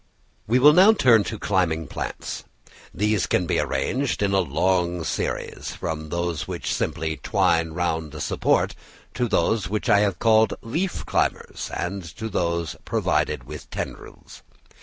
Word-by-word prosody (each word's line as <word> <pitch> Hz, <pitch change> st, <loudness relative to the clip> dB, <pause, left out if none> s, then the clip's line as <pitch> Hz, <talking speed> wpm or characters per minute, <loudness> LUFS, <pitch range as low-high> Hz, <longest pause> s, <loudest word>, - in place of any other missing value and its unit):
We 120 Hz, +4 st, +3 dB
will 145 Hz, +4 st, +7 dB
now 190 Hz, +6 st, +7 dB
turn 120 Hz, -, +5 dB
to 110 Hz, -, -4 dB
climbing 90 Hz, -6 st, 0 dB
plants. -, -, -5 dB, 0.5 s
These 105 Hz, -3 st, 0 dB
can 90 Hz, -, +1 dB
be -, -, 0 dB
arranged 130 Hz, -3 st, -1 dB
in 100 Hz, -1 st, +1 dB
a 95 Hz, -, +4 dB
long 90 Hz, +1 st, +1 dB
series, 80 Hz, -, -3 dB
from 80 Hz, -1 st, -4 dB
those 85 Hz, -1 st, -2 dB
which -, -, -3 dB
simply 80 Hz, 0 st, -2 dB
twine 80 Hz, -1 st, +1 dB
round 80 Hz, -3 st, -2 dB
a -, -, -6 dB
support, -, -, +1 dB, 0.4 s
to 120 Hz, -1 st, 0 dB
those 110 Hz, -3 st, +1 dB
which 105 Hz, +1 st, -2 dB
I 100 Hz, -, +6 dB
have 100 Hz, -4 st, +1 dB
called 110 Hz, +2 st, +4 dB
leaf 170 Hz, +11 st, -2 dB
climbers, -, -, -1 dB
and 95 Hz, +3 st, -3 dB, 0.2 s
to 110 Hz, 0 st, -4 dB
those 85 Hz, -3 st, -1 dB
provided -, -, 0 dB
with -, -, -9 dB
tendrils. -, -, -8 dB
95 Hz, 150 wpm, -24 LUFS, 85-110 Hz, 0.5 s, will